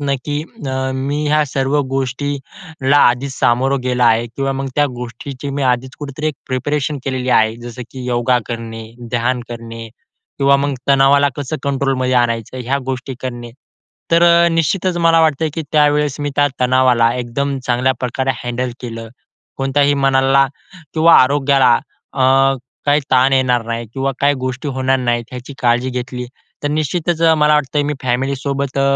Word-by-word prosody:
ना, 140 -1 -1
की 145 0 -2 0.3
अ, 130 0 -2
मी 140 +3 -2
ह्या 150 0 +3
सर्व 135 +2 0
गोष्टीला 140 +2 -2
आधीच 130 +2 +3
सामोरे 130 +3 +2
गेला 125 -1 +1
आहे 115 +1 +3
किंवा 135 +4 -3
मग 135 0 -3
त्या 145 0 +4
गोष्टीची 125 +3 -7
मी 140 0 -3
आधीच 130 +1 0
कुठेतरी 150 +2 -3 0.2
प्रिपरेशन 145 +3 -1
केलेली 130 -1 -2
आहे. 110 0 +3
जसं, 120 +1 -7
की 130 -2 -8
योगा 125 0 +1
करणे, 115 -1 -6 0.3
ध्यान 120 +1 0
करणे 115 -1 -8 0.5
किंवा 140 0 +4
मग 140 +1 -1 0.2
तणावाला 140 +1 +5
कसं 145 +2 -3
कंट्रोलमध्ये 135 -2 0
आणायचं? 120 0 0
ह्या 135 +4 0
गोष्टी 130 0 -4
करणे. 120 -2 -5 0.6
तर 170 +1 +5
अ, 170 0 +5
निश्चितच 175 +2 0
मला 165 0 +5
वाटतं, 160 0 +2
की 165 - -3
त्यावेळेस 150 -1 +2
मी 145 0 -2
त्या 145 - +4
तणावाला 125 -2 +3
एकदम 135 +3 -2
चांगल्या 125 +2 +2
प्रकारे 130 +1 -1
हँडल 120 +1 -2
केलं 115 -2 -7 0.5
कोणत्याही 140 +1 +2
मनाला 135 0 +3 0.5
किंवा 165 +1 +5
आरोग्याला 135 -2 +3 0.4
अ, 135 - 0 0.6
काही 145 +1 +4
ताण 130 +1 +4
येणार 125 -3 +2
नाही 115 0 -3
किंवा 135 0 -1
काही 145 0 +3
गोष्टी 130 +3 -3
होणार 130 0 +1
नाहीत 120 -1 -2
याची 125 +2 -8
काळजी 120 +2 +2
घेतली 125 0 -5 0.4
तर 145 - 0
निश्चितच 155 +3 -1
मला 150 -2 +4
वाटतं 145 0 +1
मी 150 - -1
फॅमिलीसोबत 135 +2 -1
अ, - - +3
135 Hz, 155 wpm, -17 LUFS, 125-145 Hz, 0.6 s, तणावाला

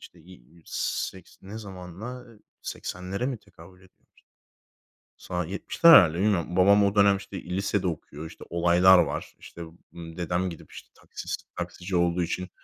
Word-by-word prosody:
işte, 85 - -15 0.5
seks 95 -3 -4
ne 100 +3 -8
zamana 100 +5 -9 0.4
80'lere 95 +7 -5
mi 130 -5 -3
tekabül 90 -2 -17
ediy 95 0 -21 1.3
Sa 90 -2 -4
70'ler 100 - +2
herhâlde. 85 -2 +7
Bilmiyorum. 90 -3 0
Babam 100 +2 +5
o 100 +1 0
dönem 100 -1 +5
işte 100 0 -9
i 90 +1 -5
lisede 100 -1 0
okuyor. 80 -2 -6
İşte, 80 - -11
olaylar 90 +2 +5
var. - - -2
İşte, 85 - -12 0.3
ımm, 85 0 -10
dedem 90 +1 -1
gidip 85 - -11
işte - - -12
taksisi - - -6 0.2
taksici 90 +1 -5
olduğu 85 0 +2
için, 90 +2 -4
90 Hz, 145 wpm, -26 LUFS, 85-100 Hz, 1.3 s, herhâlde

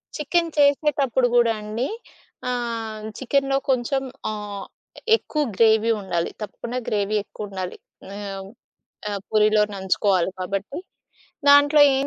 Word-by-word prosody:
Chicken 335 +3 0
చేసేటప్పుడు 285 -3 +3
గూడా 235 -2 +5
అండి 215 +5 -3 0.6
ఆహ్, 230 -3 -3
చికెనులో 275 +1 +1
కొంచెం 265 +1 +1 0.3
ఆహ్, 205 -1 -6 0.5
ఎక్కువ 305 -8 -3
గ్రేవీ 220 +1 +4
ఉండాలి. 175 -3 -1
తప్పకుండా 230 +4 -5
గ్రేవీ 205 0 0
ఎక్కువుండాలి. 195 -4 -6 0.4
ఆహ్. 195 -2 -6 0.6
ఆ! - - -3 0.2
పూరిలో 215 0 +4
నంచుకోవాలి 190 -1 +1
కాబట్టి, 195 +7 -3 0.7
దాంట్లో 285 +1 +7 0.2
ఏం 275 +1 0
225 Hz, 105 wpm, -23 LUFS, 205-270 Hz, 0.7 s, దాంట్లో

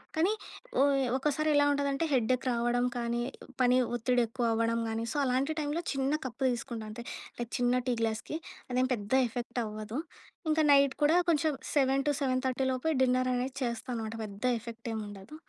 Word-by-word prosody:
కానీ 335 +6 +3 0.5
ఒ - - +7 0.3
ఒక్కసారి 300 +3 +1
ఎలా 290 - +5
ఉంటుందంటే 280 +2 0
హెడ్ఎక్ 255 +1 +2
రావడం 240 +1 +1
కానీ, 235 0 -1 0.4
పని 250 0 +5 0.2
ఒత్తిడి 245 +1 +2
ఎక్కువ 240 +1 -2
అవ్వడం 230 +1 +1
కానీ. 225 +1 -2
సో, - - -6
అలాంటి 265 +3 +1
టైమ్‌లో 300 +3 -1
చిన్న 270 +1 0
కప్పు 255 +1 -7
తీసుకుంటా 235 -2 -4
అంతే. 220 +3 -7 0.4
లైక్ 240 -1 -5
చిన్న 245 0 +2
టీ 250 - +2
గ్లాస్‌కి. 225 +6 -2 0.4
అదేం 255 +1 +2
పెద్ద 205 -1 -5 0.2
ఎఫెక్ట్ 240 +1 -4
అవ్వదు. 215 +2 -5 0.5
ఇంకా 315 0 +3
నైట్ 280 -1 +6
కూడా 305 +3 +5
కొంచెం 310 -1 +3 0.2
7:00-7:30 265 0 +1
డిన్నర్ 255 0 +3
అనేది 255 +2 -1
చేస్తా 235 0 -3
అనమాట. 220 -1 -4
పెద్ద 200 +2 -8 0.2
ఎఫెక్ట్ 230 0 -9
ఏం 220 - -2
ఉండదు. 200 +8 -10
250 Hz, 160 wpm, -30 LUFS, 235-275 Hz, 0.5 s, ఒ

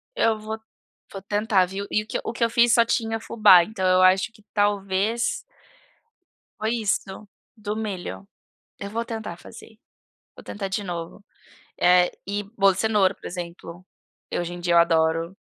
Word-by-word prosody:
Eu 225 - +2
vou 220 +1 -5 0.5
vou 195 - -7
tentar, 205 -1 +1
viu, 195 +2 -5
e 210 - +2
o - - -21
que - - -2
e - - -5
o 225 - -4
que 230 - -2
eu 230 - +3
fiz 235 0 +4
só 235 - +6
tinha 225 -1 -1
fubá, 190 -6 +6
então 190 -1 -4
eu 185 0 +4
acho 185 +3 +4
que 215 - -22
talvez 205 +2 0 1.2
foi 220 +1 -1 0.2
isso, 190 0 -1 0.4
do 210 -1 -5
milho. 180 - -5 0.5
Eu 200 - -6
vou 230 +2 -2
tentar 225 -1 -6
fazer. - - -14 0.6
Vou - - -13
tentar 200 -1 -5
de 195 +2 -3
novo, 175 +2 -6 0.6
eh, 180 0 +5 0.2
e 205 +1 -2
bolo 195 -2 +2
de - - -4
cenoura, 210 -4 +2
por - - -23
exemplo, 175 0 -8 0.5
eu - - -1
hoje 175 0 -5
em 175 - -7
dia 175 0 0
eu - - +7
adoro. 165 +1 +2
200 Hz, 180 wpm, -24 LUFS, 180-220 Hz, 1.2 s, eu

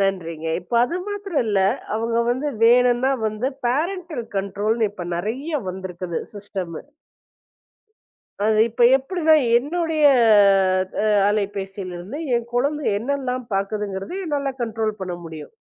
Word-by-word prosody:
நன்றிங்க. 170 -5 -2
இப்ப 240 - -6
அது 340 +8 -3
மாத்தரம் 400 -8 -2
இல்ல. 205 -2 +1 0.4
அவுங்க 230 +1 0
வந்து 260 +5 -1 0.2
வேணுன்னா 245 +2 +4 0.2
வந்து 215 +4 -1 0.2
பேரண்டல் 315 0 -2
கன்ட்ரோல்ன்னு 210 +3 0
இப்ப 180 - -7
நிறைய 230 - -3 0.2
வந்திருக்குது 180 -2 -5
சிஸ்டமு. 190 -5 -6 1.6
அது 215 0 +3
இப்ப 235 +2 -1
எப்பிடின்னா 315 +3 +2 0.2
என்னுடைய 320 +2 -1 1.0
அ - - +1 0.2
அலைபேசில 195 -2 -3
இருந்து 190 +12 -7 0.2
என் 235 0 -3
குழந்தை 285 +4 0
என்னெல்லாம் 255 +1 -2
பாக்குதுங்கிறதையும் 200 - -3
என்னால 280 -2 -1
கன்ட்ரோல் 220 -2 -2
பண்ண 180 -2 -4
முடியும். 160 - -9
225 Hz, 115 wpm, -22 LUFS, 195-280 Hz, 1.6 s, வேணுன்னா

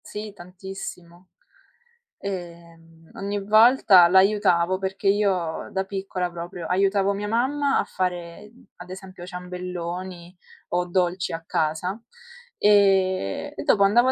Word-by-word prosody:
Sì, 210 0 -7
tantissimo. 180 -1 -10 0.9
Ehm, 170 -3 -9
ogni 200 +1 -3
volta 215 -3 +6
l'aiutavo, 185 -1 +3
perché 195 +1 -3
io 195 -5 0
da 190 - -1
piccola 190 -2 -3
proprio 170 0 -7
aiutavo 195 +1 +2
mia 205 +1 -4
mamma 275 +6 +1
a - - +1
fare, 180 +2 -4 0.3
ad 180 +1 -11
esempio 185 -1 -10
ciambelloni 180 0 -7 0.3
o 180 0 0
dolci 180 0 -1
a 165 0 -5
casa, 160 +7 -2 0.6
ehm, 190 - +2
e - - -4
dopo 200 - +3
andavo 240 +6 +4
185 Hz, 115 wpm, -24 LUFS, 175-200 Hz, 0.9 s, volta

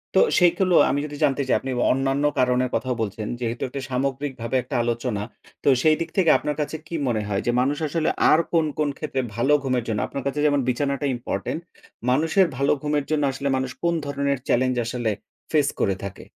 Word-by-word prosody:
তো - - +6 0.2
সেইগুলো 180 0 +3
আমি 140 - +1
যদি 145 -1 -7
জানতে 135 +1 +2
চাই - - +4
আপনি 135 - -5
ব - - 0
অন্যান্য 135 +2 0 0.2
কারণের 125 0 +2
কথাও 130 -1 -1
বলছেন। 105 0 -3
যেহেতু 120 -1 -3
একটা 135 +2 -6
সামগ্রিকভাবে 130 -2 -2
একটা 130 +3 -6
আলোচনা, 120 -3 -2 0.4
তো - - -3
সেই 155 -1 +5
দিক 165 0 -3
থেকে 180 -4 +4
আপনার 150 0 -3
কাছে 150 - -3
কী 170 - -5
মনে 110 -3 0
হয়? 100 -1 -1
যে 120 - +2
মানুষ 140 +3 0
আসলে 160 +2 0 0.2
আর 155 - +6
কোন, 165 -2 +3
কোন, 150 -1 +1
ক্ষেত্রে 135 -4 -2
ভালো 135 +5 +2
ঘুমের 130 -3 0
জন্য 105 -2 -1
আপনার 140 - -5
কাছে 140 +2 -2
যেমন 145 -1 +3
বিছানাটা 140 +2 0
ইম্পোর্টেন্ট, 120 - -3 0.5
মানুষের 160 +7 +3
ভালো 140 +1 +2
ঘুমের 150 -1 0
জন্য 150 -1 +1
আসলে 140 +1 -4
মানুষ 130 -1 -2
কোন 170 - +2
ধরনের 140 -1 -1
চ্যালেঞ্জ 130 +1 +2
আসলে 120 -2 -1 0.4
ফেস 150 -3 +3
করে 100 -1 +1
থাকে? 100 0 -7
135 Hz, 200 wpm, -23 LUFS, 125-150 Hz, 0.5 s, তো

